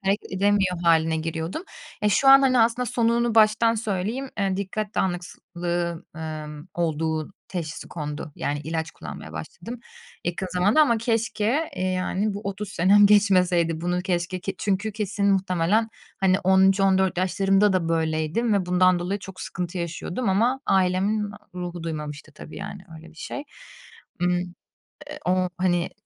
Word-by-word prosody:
Hareket 195 0 -1
edemiyor 195 -2 +2
hâline 160 -1 +3
giriyordum. 165 - -3 0.4
E, 210 - +4
şu 270 +6 +3
an, 275 0 +10
hani, 255 -2 +4
aslında 235 +2 +2
sonunu 235 -1 +1
baştan 220 +1 +5
söyleyeyim, 220 +5 -2
eee, 195 -1 0
dikkat 205 +2 -4
dağınıklığı, 175 -1 -3
emm, 155 0 -6
olduğu 160 0 -1 0.2
teşhisi 165 -4 -5
kondu. 150 -1 -6
Yani 145 0 -2
ilaç 160 +1 -3
kullanmaya 80 - -9
başladım 175 - -8 0.4
yakın 175 +2 -2
zamanda 200 +10 +4
ama 235 -7 +4
keşke, 230 +5 0
eee, - - -2
yani 185 +2 -1
bu 205 - -5
30 200 +1 -4
senem 195 +3 +5
geçmeseydi 180 -5 +3
bunu 175 +1 0
keşke 180 0 -2
ki 195 +1 -4
çünkü 205 +2 -1
kesin 205 -1 -1
muhtemelen 190 +3 +1 0.3
hani 190 0 +3
13-14 190 0 +3
yaşlarımda 195 +2 +3
da 175 -3 0
böyleydim 160 +7 0
ve 195 -3 +1
bundan 180 0 +4
dolayı 190 +4 -2
çok 190 -1 -10
sıkıntı 180 0 -4
yaşıyordum 175 +7 -3
ama 235 +8 +2
ailemin 195 +3 +1 0.2
ruhu 175 -1 -5
duymamıştı 150 -2 -6
tabii. 155 - -11
Yani - - -7
öyle 160 +1 -13
bir 160 - -21
şey. 285 - -6 0.8
Imm, 180 0 +2 0.8
eee, - - -7
o 185 0 +2
hani 175 -2 +1
185 Hz, 145 wpm, -24 LUFS, 170-210 Hz, 0.8 s, an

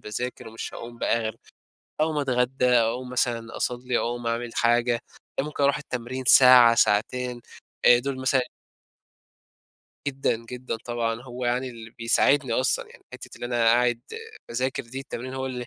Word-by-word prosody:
باذاكر 115 +3 -5
ومش 115 0 -7
هاقوم 120 0 -9
بقى 115 - +1
غير 110 -1 -4 0.6
أقوم 155 -1 +1
اتغدّى 130 -1 0
أقوم 125 +1 +2
مثلًا 120 -2 -2
أصلّي، 125 0 -1
أقوم 120 0 -3
أعمل 115 +1 -2
حاجة، 120 0 +2 0.4
أ - - 0
ممكن 150 -1 -4
اروح 140 +1 +3
التمرين 130 -1 -5
ساعة 125 -2 +8
ساعتين 120 +3 +1 0.4
أ 120 - +7
دول 135 +2 -3
مثلًا 130 0 +2 1.7
جدًا، 135 -4 0
جدًا 120 +1 -6
طبعًا، 115 -1 -2
هو 125 0 -7
يعني 125 +2 -1
اللي 115 -1 -11
بيساعدني 125 +2 +2
أصلًا 130 +2 0
يعني - - -18
حتَّة - - -10
اللي - - -5
أنا 120 -1 0
قاعد 120 +1 +3 0.5
باذاكر 130 +2 -2
دي، 125 +3 -7
التمرين 130 -1 -7
هو 130 0 -3
اللي 125 -2 -5
120 Hz, 155 wpm, -25 LUFS, 115-130 Hz, 1.7 s, ساعة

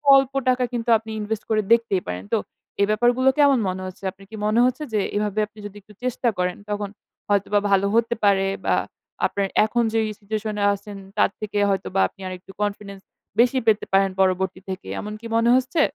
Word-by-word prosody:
অল্প 270 0 +3 0.2
টাকা 255 0 +2
কিন্তু 235 0 -2
আপনি 220 0 -10
invest 215 +1 -3
করে 215 -1 +2
দেখতেই 230 -5 +2
পারেন। 90 +1 -4
তো - - +5 0.4
এই 200 - +6
ব্যাপার 220 +3 +3
গুলো 260 +1 +4
কেমন 280 -4 +5
মনে 185 0 -3
হচ্ছে? 185 - -11
আপনার 195 +1 -17
কি 220 - -7
মনে 215 +2 +2
হচ্ছে 255 +4 0
যে, 210 - +2 0.2
এভাবে 210 0 0
আপনি 215 0 -18
যদি 205 -1 -8
একটু 210 +2 -18
চেষ্টা 250 -1 0
করেন, 180 0 -1
তখন 205 -1 -2 0.4
হয়তোবা 205 0 +2
ভালো 195 0 +3
হতে 230 +1 +2
পারে? 195 -1 +4 0.2
বা - - +3 0.5
আপনার 200 -1 0 0.2
এখন 235 +2 +1
যেই 225 -1 +2
situation 215 +1 -3
এ - - +2
আছেন 200 0 -8 0.2
তার - - +4
থেকে 210 -1 -4
হয়তোবা 195 0 0
আপনি 195 - -19
আরেকটু 185 +1 -8
confidence 200 -1 -4 0.4
বেশি 245 +2 +4
পেতে 215 -1 +3
পারেন 195 0 +4
পরবর্তী 190 0 +1
থেকে, 185 0 -6
এমন 210 0 -5
কি 230 - -7
মনে 230 +1 +3
হচ্ছে? 260 +5 +1
210 Hz, 200 wpm, -23 LUFS, 195-230 Hz, 0.5 s, এই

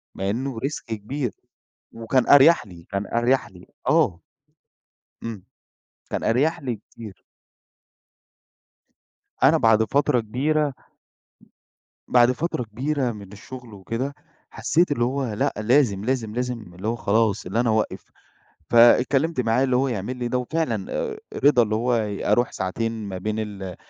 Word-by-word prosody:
مع 95 +1 -2
إنه 125 +2 -3
risk 140 +5 -3
كبير. 120 +4 -4 0.6
وكان 115 +3 0
أريح 145 +2 +7
لي، 85 -4 -13
كان 100 0 -2
أريح 120 +5 +1
لي، 90 -1 -16 0.2
آه. 135 - +3 1.0
إمم، 110 -5 -6 0.7
كان - - -3
أريح 150 +9 +2
لي 125 -4 -2
كتير. 105 -1 -13 2.2
أنا - - +6
بعد 110 -1 +4
فترة 130 +3 +2
كبيرة 140 +6 0 1.3
بعد 120 0 +5
فترة 150 -1 -2
كبيرة 130 +4 -2
من 100 -3 -10
الشغل 125 +2 -11
وكده، 115 +8 -4 0.4
حسيت 170 0 +1
اللي 120 -5 +1
هو 130 -2 -2
لأ، 105 - 0
لازم، 110 -3 +2
لازم، 120 -4 -1
لازم 120 -6 -4
اللي 95 +4 -6
هو 115 - 0
خلاص 110 -2 +1
إن 90 - -7
أنا 120 0 +2
أوقف. 110 0 0 0.7
فإتكلمت 130 +6 +4
معاه 120 +2 +2
اللي 130 -2 +2
هو 135 +2 +2
يعمل 120 +1 -3
لي 120 -1 -3
ده، 125 - 0
وفعلًا 160 +6 -2
آآ، 485 -4 -3 0.3
رضى 140 -4 +6
اللي 110 -1 -1
هو 120 +3 +1
ي 105 -3 -3
أروح 120 +3 +2
ساعتين 115 +5 -2 0.2
ما 95 -1 -5
بين 110 +3 -3
ال 100 -4 -5
120 Hz, 145 wpm, -23 LUFS, 105-135 Hz, 2.2 s, أريح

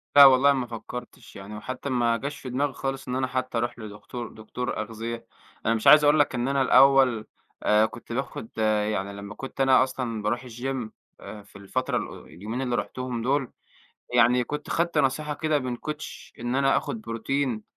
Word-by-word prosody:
لا 140 -1 +11
والله 135 +1 +7
ما 130 -3 -2
فكّرتِش 120 +1 -9
يعني 100 +2 -8
وحتّى 130 +5 -5
ما 120 -2 +2
جاش 140 +3 -5
في 130 - -7
دماغي 135 +3 0
خالص 135 0 -4
إن 125 - -2
أنا 130 0 0
حتّى 130 -1 -2
أروح 120 +1 -2
لدكتو 110 +2 -7
دكتور 110 +3 -5
أغذية، 115 +2 -6 0.4
أنا 115 - +3
مش 110 +3 -1
عايز 150 +2 +9
أقول 150 +1 +5
لَك 145 -2 +2
إن 120 +1 -1
أنا 140 0 +1
الأوّل، 130 -4 +5 0.4
آآ 105 +1 +4
كنت 115 +1 -8
باخد 120 -3 -4
يعني 105 -2 0
لمّا 100 +1 -8
كنت 135 0 -6
أنا 135 -1 +6
أصلًا 125 -4 -3
باروح 120 +5 -1
الGym 125 0 -4 0.3
آآ 105 -2 -9
في 100 - -23
الفترة 115 +6 -2
ال - - -6
اليومين 105 +9 -5
اللي 125 -2 -1
رُحتُهم 125 -2 -3
دول 135 +1 0 0.6
يعني 120 +1 +5
كنت 150 +4 -6
خدت 170 +1 0
نصيحة 150 +3 +1
كده 155 0 0
من 125 -2 -4
Coach 150 +4 -7
إن 120 +2 -2
أنا 135 0 +3
آخد 225 - -3
بروتين، 115 - -2
125 Hz, 185 wpm, -26 LUFS, 115-135 Hz, 0.6 s, لا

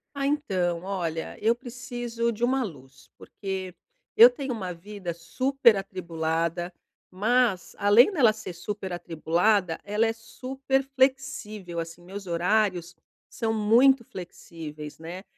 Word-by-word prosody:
Ah, 275 0 0
então 185 - 0
olha, 175 -4 -3
eu 230 +2 +3
preciso 240 -2 -3
de 230 +2 -6
uma 260 +1 +2
luz, 140 - -10
porque 190 -2 -6 0.4
eu 465 +3 +10
tenho 280 - -5
uma 190 -6 -4
vida 185 0 -6
super 235 +8 +2
atribulada, 170 -2 -2 0.4
mas 220 0 +1
além 205 - +6
dela 255 - +4
ser 215 -3 -7
super 190 +2 -5
atribulada, 175 +2 +1
ela 210 +2 +1
é 225 - +2
super 265 +4 -2
flexível. 215 -9 0
Assim, 165 +1 -6
meus 195 +2 -8
horários 175 0 +1 0.4
são 225 -1 -2
muito 235 +5 +5
flexíveis, 160 -6 -9
né. 175 +4 -7
205 Hz, 125 wpm, -26 LUFS, 175-240 Hz, 0.4 s, eu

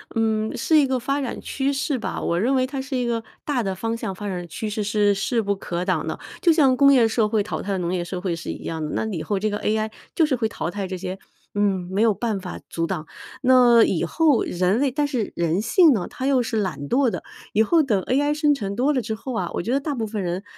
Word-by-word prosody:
嗯， 220 -1 0
是 320 - +3
一 295 - +5
个 260 -1 0
发 275 +4 -1
展 260 - -4
趋 275 0 -1
势 275 0 -1
吧， 225 - -4
我 170 - 0
认 245 +8 +2
为 255 -1 +2
它 265 0 -4
是 270 0 -5
一 250 - 0
个 230 -1 -1 0.2
大 270 -5 0
的 195 -2 -1
方 225 +5 -3
向 195 - -4
发 205 +2 -6
展 180 -3 -4
趋 215 +6 -4
势 210 0 -2
是 205 0 +2
势 195 +4 0
不 200 -1 0
可 175 -2 -4
挡 180 -4 0
的。 - - -4 0.2
就 340 - +5
像 280 -5 +4
工 280 0 +6
业 240 -4 +5
社 225 -1 +1
会 215 0 +1
淘 - - -4
汰 195 -1 -2
农 175 0 -2
业 180 -1 -1
社 180 +1 -5
会 180 -3 -1
是 165 - -7
一 - - -8
样 160 -1 -4
的， 150 - -5
那 - - -1
以 160 - -3
后 205 -2 -1
这 215 +2 0
个 205 - -2
AI 220 0 0 0.2
就 325 - +4
是 295 -3 +1
会 225 -2 0
淘 195 - -4
汰 195 +2 -4
这 185 0 -4
些 185 +1 -5 0.4
嗯， 195 -3 +1
没 195 +2 0
有 225 -2 +4
办 220 -1 -2
法 185 -1 -7
阻 165 - -1
挡。 155 -1 -4 0.3
那 250 -3 +6
以 170 - +1
后 295 - +3
人 185 +5 +1
类 275 -1 +2
但 290 +3 0
是 250 -7 -2
人 170 +2 0
性 320 - +5
呢， 195 -7 -2
它 260 - -5
又 270 -2 +3
是 225 -1 -2
懒 155 -8 -4
惰 265 0 +3
的， - - -5 0.3
以 220 - +4
后 325 +8 +4
等 220 -8 +1
AI 290 +3 +1
生 300 -1 +3
成 200 -7 -4
多 265 +6 +2
了 260 - +1
之 220 0 -3
后 255 +4 -6
啊， 180 -6 -2
我 - - -1
觉 225 - -3
得 275 - +3
大 290 0 -3
部 230 -3 -2
分 210 -1 -4
人 180 +2 -3
220 Hz, 295 characters per minute, -23 LUFS, 190-260 Hz, 0.4 s, 工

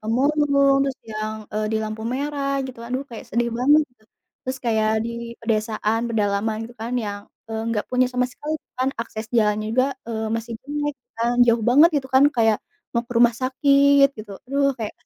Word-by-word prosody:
pemulung, 280 +4 +3
terus 270 -1 -2
yang, 215 0 -3 0.2
eee, 215 0 -1
di 220 - +2
lampu 215 0 -5
merah, 280 0 -2 0.2
gitu. 255 -2 -10
Aduh, 255 +3 -2
kayak 230 - -8
sedih 235 +2 0
banget, 290 +5 +5
gitu. 230 -3 -33 0.4
Terus 260 +1 -3
kayak 220 -1 +2
di 235 - -3 0.3
pedesaan, 220 0 0
pedalaman 215 -1 0
gitu 240 - -15
kan 235 +2 -4
yang, 205 0 -4 0.3
eee, 220 0 -3
nggak 210 -2 -1
punya 255 0 +3
sama 250 0 +1
sekali 300 +4 -5 0.2
kan, 260 +1 +2
akses 220 -1 -5
jalannya 215 0 +1
juga, 255 +2 +3 0.2
eee, 220 -1 -3
masih 230 +1 -6
jelek, 290 +1 -3 0.2
kan. 235 +1 0
Jauh 230 -1 +3
banget, 300 +6 +7
gitu 265 -2 -2
kan, 265 +2 +7
kayak 225 -2 +4 0.4
mau 235 - +1
ke 245 - -7
rumah 240 -1 +5
sakit, 280 +1 +5
gitu. 210 -2 -8
Aduh, 280 +1 +1
kayak 220 -2 -4
235 Hz, 185 wpm, -23 LUFS, 220-275 Hz, 0.4 s, banget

